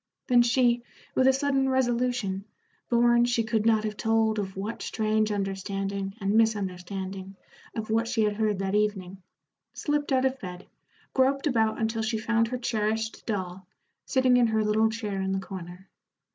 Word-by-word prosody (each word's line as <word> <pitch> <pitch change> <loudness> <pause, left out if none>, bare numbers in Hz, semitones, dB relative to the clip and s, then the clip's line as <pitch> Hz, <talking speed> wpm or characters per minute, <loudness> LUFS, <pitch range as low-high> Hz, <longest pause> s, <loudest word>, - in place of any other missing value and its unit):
Then 245 -1 +5
she, 240 0 +3 0.3
with 260 - +3
a - - +7
sudden 270 0 +1
resolution, 245 -6 0 0.5
born 240 0 +4
she 240 -1 +1
could 220 -1 0
not 220 -1 +3
have 215 -1 -3
told 220 -1 +1
of 190 -2 -5
what 210 +4 -4
strange 215 -1 0
understanding 195 0 -3
and 200 0 0
misunderstanding 195 -3 -1 0.4
of 220 -1 -4
what 225 +1 +1
she 230 -2 +1
had 210 -1 0
heard 215 -2 +1
that 195 0 -2
evening, 195 -3 -1 0.5
slipped 295 -1 -1
out 260 0 +3
of 265 0 0
bed, 180 -1 -8 0.5
groped 275 +2 +2
about 225 -6 +1
until 225 0 -1
she 220 +1 -1
found 230 +1 +1
her 250 +2 -3
cherished 220 -2 -2
doll, 185 -3 -4 0.4
sitting 260 -2 +3
in 240 -1 +4
her 220 -1 +1
little 215 +1 +3
chair 210 -4 -3
in 190 0 -1
the 195 - 0
corner. 185 -1 -9
220 Hz, 165 wpm, -27 LUFS, 195-240 Hz, 0.5 s, a